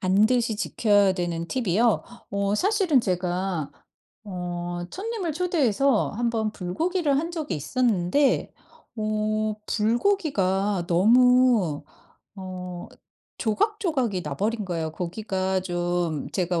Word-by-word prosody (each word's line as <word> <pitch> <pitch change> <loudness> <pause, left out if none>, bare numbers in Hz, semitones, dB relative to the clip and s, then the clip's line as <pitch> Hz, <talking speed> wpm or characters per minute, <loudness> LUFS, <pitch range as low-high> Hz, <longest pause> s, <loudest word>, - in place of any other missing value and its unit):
반드시 215 +4 +2
지켜야 205 -3 +3
되는 170 -2 -3
팁이요? 230 -1 +1 0.3
어 200 0 0
사실은 375 - +3
제가 180 -5 -2 0.5
어 175 -2 -4
손님을 405 -5 -3
초대해서 280 - +1
1 235 +2 -1
번 220 -2 -1
불고기를 295 - 0
한 330 +3 -2
적이 315 - -3
있었는데 230 - +1 0.4
어 215 0 -1
불고기가 210 - +1
너무 230 - +4 0.5
어 180 -2 -7 0.5
조각조각이 260 - 0
나버린 205 +10 -2
거예요. 165 -4 -3
고기가 190 +1 -2
좀 175 -3 -2
제가 180 -2 0
210 Hz, 225 characters per minute, -25 LUFS, 180-250 Hz, 0.5 s, 너무